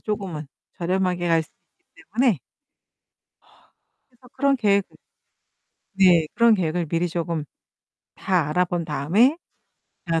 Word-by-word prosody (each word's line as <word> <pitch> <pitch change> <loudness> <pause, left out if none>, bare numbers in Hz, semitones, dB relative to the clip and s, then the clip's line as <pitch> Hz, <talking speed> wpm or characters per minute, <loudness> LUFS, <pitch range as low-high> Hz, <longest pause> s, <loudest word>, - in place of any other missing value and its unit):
쪼금은 190 -8 -4 0.3
저렴하게 180 0 -1
갈 165 -1 +3
수 - - -18 0.3
있기 - - -22
때문에 235 - +3 1.7
그래서 250 0 -21
그런 275 +1 +1
계획을 200 -5 +1 1.0
네. 180 -4 +5
그런 235 -1 +5
계획을 170 -2 -1
미리 170 +3 -1
조금 170 -2 -3 0.7
다 180 -6 0
알아 180 +4 +2
본 175 -1 -3
다음에 180 - +2 0.7
어 165 0 +2
180 Hz, 235 characters per minute, -23 LUFS, 165-210 Hz, 1.7 s, 네